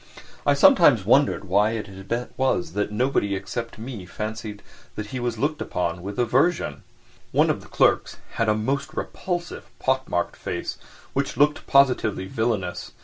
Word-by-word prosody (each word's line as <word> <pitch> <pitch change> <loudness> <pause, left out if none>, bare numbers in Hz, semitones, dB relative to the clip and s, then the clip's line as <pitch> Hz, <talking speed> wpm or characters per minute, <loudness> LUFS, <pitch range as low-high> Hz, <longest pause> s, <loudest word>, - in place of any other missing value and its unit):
I 145 - +5
sometimes 140 - +6
wondered 135 +4 +3
why 100 +3 +2
it 110 -2 -4 0.5
was 90 -11 0
that 105 +1 -1
nobody 105 -3 +1
except 115 +5 -5
me 110 -5 -7
fancied 110 0 -6 0.3
that 105 - -4
he 130 - -2
was 120 -2 -2
looked 150 +6 -1
upon 85 -1 -2
with 100 +2 -6
aversion? 125 - +1 0.5
One - - +4
of - - -4
the - - -14
clerks - - +2
had 115 -1 0
a 105 - +3
most 140 +7 -2
repulsive, 175 -2 -4
pock 130 0 0
marked 85 - -1
face, - - -4 0.3
which - - -1
looked 145 +2 +2
positively 125 -8 +3
villainous. 105 -4 -2
115 Hz, 150 wpm, -24 LUFS, 100-135 Hz, 0.5 s, sometimes